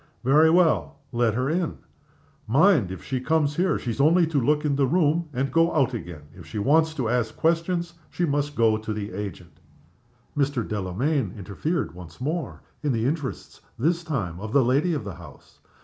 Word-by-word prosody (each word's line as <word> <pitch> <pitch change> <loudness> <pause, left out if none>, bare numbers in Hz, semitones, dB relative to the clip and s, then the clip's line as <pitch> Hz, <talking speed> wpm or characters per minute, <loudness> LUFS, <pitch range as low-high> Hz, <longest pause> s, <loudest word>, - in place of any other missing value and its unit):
"Very 150 +5 +5
well. 170 -1 +2
Let 120 -3 +1
her 130 +2 0
in. 170 +2 -1 0.7
Mind, 140 - +4
if 95 - -8
she 130 -2 -2
comes 150 +1 +1
here, 185 +1 +2
she's 120 +2 -3
only 165 +4 +5
to 155 -4 0
look 150 +4 +1
into 140 -2 +1
the 140 -2 +3
room, 160 +1 +1
and 135 +1 -2
go 165 0 +3
out 135 -4 +2
again. 85 -9 -7
If - - -13
she - - -7
wants 155 +8 +3
to 130 -6 -1
ask 120 -1 0
questions, 170 +1 0 0.2
she 175 - -1
must 145 -1 -1
go 110 -2 +3
to 110 0 -4
the 105 -1 -5
agent." 95 -3 -7 0.8
Mr. 140 -5 0
Delamayn 105 - -1
interfered 125 - -3
once 85 -2 -12
more, 155 +6 -3 0.2
in 145 -3 0
the 115 0 0
interests, 145 0 -4 0.2
this 165 +7 +1
time, 100 - -3
of 110 +3 -6
the 140 -3 +4
lady 145 +7 +2
of 140 - -3
the 100 -4 -7
house. 75 -7 -15
140 Hz, 185 wpm, -25 LUFS, 110-160 Hz, 0.8 s, Very